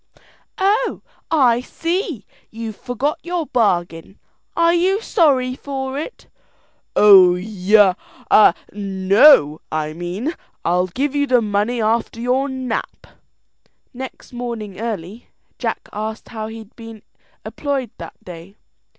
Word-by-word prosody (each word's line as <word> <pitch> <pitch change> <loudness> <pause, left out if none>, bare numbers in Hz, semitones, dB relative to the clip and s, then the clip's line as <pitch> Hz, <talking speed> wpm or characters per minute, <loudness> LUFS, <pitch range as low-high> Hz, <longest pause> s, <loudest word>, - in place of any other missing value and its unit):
"Oh, 415 +6 0 0.3
I 255 -7 +3
see, 335 - -3 0.2
you've 225 -1 -7
forgot 255 +7 -3
your 345 -2 -3
bargain. 180 - -1 0.4
Are 335 0 +4
you 370 +4 +2
sorry 270 - +2
for 265 0 -5
it?" 400 +11 -8 0.7
"Oh, 190 -4 +7
ya 200 +1 +3 0.8
no, 195 - +4
I 155 -1 -2
mean. 180 - -4 0.3
I'll 180 +2 +2
give 265 +10 -2
you 285 0 +1
the 250 -2 +4
money 210 +3 0
after 230 +1 0
your 255 +4 0
nap." 260 -3 -4 0.9
Next 260 0 -9
morning 230 -5 -6
early, 215 -1 -5 0.3
Jack - - -3
asked 215 +1 -5
how 220 -2 -5
he'd 220 -1 -11
be 225 -2 -11 0.4
employed 275 -6 -3
that - - -8
day. 180 +2 -11
230 Hz, 115 wpm, -19 LUFS, 200-270 Hz, 0.9 s, Oh